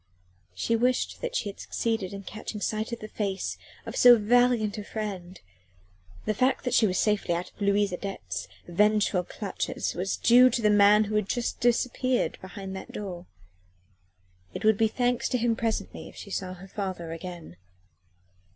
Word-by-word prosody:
She 230 - 0
wished 250 +2 0
that - - -3
she 215 - -1
had 200 - -10
succeeded 225 -5 -2
in 200 0 -7
catching 215 +2 -7
sight 215 +2 -2
of 235 - -5
the 215 - -6
face 200 -3 -3 0.3
of - - -6
so 245 -1 +8
valiant 230 -1 +2
a - - -5
friend: 195 -4 -6 0.9
the 215 - +1
fact 255 +5 +1
that 250 - -1
she 220 - +5
was 185 - -1
safely 210 -5 +1
out 175 +1 -4
of - - -22
Louise 200 0 +2
Adet's 140 - -5 0.2
vengeful 205 0 +2
clutches 195 +2 -4
was 185 +2 -2
due 250 +2 +7
to 240 -1 -1
the 210 - +5
man 205 +1 +6
who 215 0 -5
had 210 -2 0
just 240 -1 -2
disappeared 245 +1 +1
behind 190 0 -7
that 190 - -8
door. 180 -4 -6 1.3
It - - -4
would 220 -2 +4
be 225 - +5
thanks 245 +2 0
to 250 - +1
him 235 -1 +1
presently 225 -1 -3
if - - -17
she 200 - -10
saw 185 -1 -3
her 190 +2 -12
father 185 -4 -5
again. 165 - -8
210 Hz, 175 wpm, -27 LUFS, 190-230 Hz, 1.3 s, so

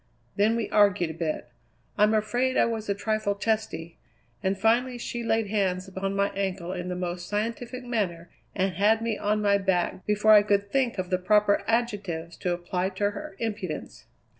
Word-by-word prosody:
Then 215 +3 +3
we 230 -2 -1
argued 200 -5 +3
a - - -7
bit 155 -6 -3 0.5
I'm 210 +1 +4
afraid 240 +5 +1
I - - +5
was 225 -2 -3
a 200 - +1
trifle 215 0 -1
testy 200 -6 -2 0.4
and 190 +1 0
finally 240 +5 +2
she 240 0 -4
laid 225 -2 0
hands 190 -3 0
upon 195 +1 -3
my 200 0 +2
ankle 190 -3 -3
in 180 -1 -4
the 180 - -3
most 175 0 -4
scientific 235 +4 -3
manner 185 -9 -2 0.2
and 190 -1 0
had 220 +4 +3
me 225 -2 -1
on 210 +1 0
my 200 -1 +4
back 190 -1 0
before 210 +1 +4
I 210 -1 +9
could 200 -1 0
think 260 -5 +1
of 185 0 -3
the 185 - +2
proper 205 +1 +3
adjectives 200 -8 -1
to 180 - -2
apply 180 +1 -1
to 205 0 +1
her 200 -1 -8
impudence." 205 -7 -5
205 Hz, 185 wpm, -27 LUFS, 185-220 Hz, 0.5 s, I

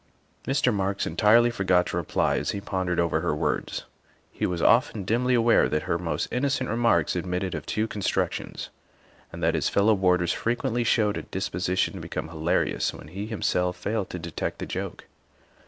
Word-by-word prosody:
' - - -39
' - - -27
Mr. 130 -3 +2
Marks 100 0 -1
entirely 110 +8 +4
forgot 95 -5 +2
to - - -4
reply 85 -3 0
as 75 - -3
he 100 - -2
pondered 95 -3 -2
over 85 -2 +1
her 85 -3 0
words; - - -2 0.5
he - - -1
was 90 -2 -2
often 115 0 +3
dimly 125 +6 +1
aware 115 0 +4
that 75 0 -1
her 85 - -1
most 85 -1 -2
innocent 130 -1 0
remarks 115 -10 +2
admitted 90 +1 -2
of 75 -2 -5
two 110 +1 0
constructions, 105 -3 -2 0.6
and 85 0 -7
that 80 0 +3
his 80 -5 +1
fellow 105 +2 +3
boarders 90 -2 +2
frequently 120 +1 -1
showed 110 -3 +2
a - - -3
dispo 95 -2 -4
sition 90 0 +1
to - - -7
become 80 - -5
hilarious 80 +1 0
when 75 - -11
he, 100 +5 -5
himself, 90 -5 0
failed 100 +1 -2
to - - -5
detect 85 -2 -4
the - - -5
joke. - - -5
95 Hz, 190 wpm, -26 LUFS, 85-110 Hz, 0.6 s, entirely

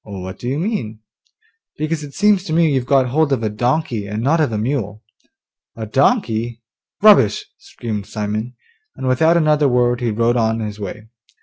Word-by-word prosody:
'What 95 -2 -8
do 120 - -6
you 135 - -1
mean?' 150 - -3 0.8
'Because 155 0 -2
it 140 -1 -10
seems 205 -2 +3
to 155 - -3
me 165 -2 +3
you've 130 -2 -1
got 130 -2 +3
hold 150 +2 +1
of 125 -4 0
a 110 - -1
donkey, 120 -1 -1
and 105 +2 -4
not 160 +5 +2
of 150 - +1
a 110 - -2
mule.' 110 -3 -3 0.7
'A 110 - -5
donkey? 120 - 0 0.4
Rubbish!' 200 - +5
screamed 105 -4 -6
Simon, 110 +3 -4 0.4
and 130 - -5
without 160 +7 +3
another 150 -2 +3
word 125 0 +1
he 120 - 0
rode 115 +3 +1
on 110 -1 +1
his 105 -1 -5
way. 105 +2 -7
120 Hz, 180 wpm, -19 LUFS, 110-150 Hz, 0.8 s, Rubbish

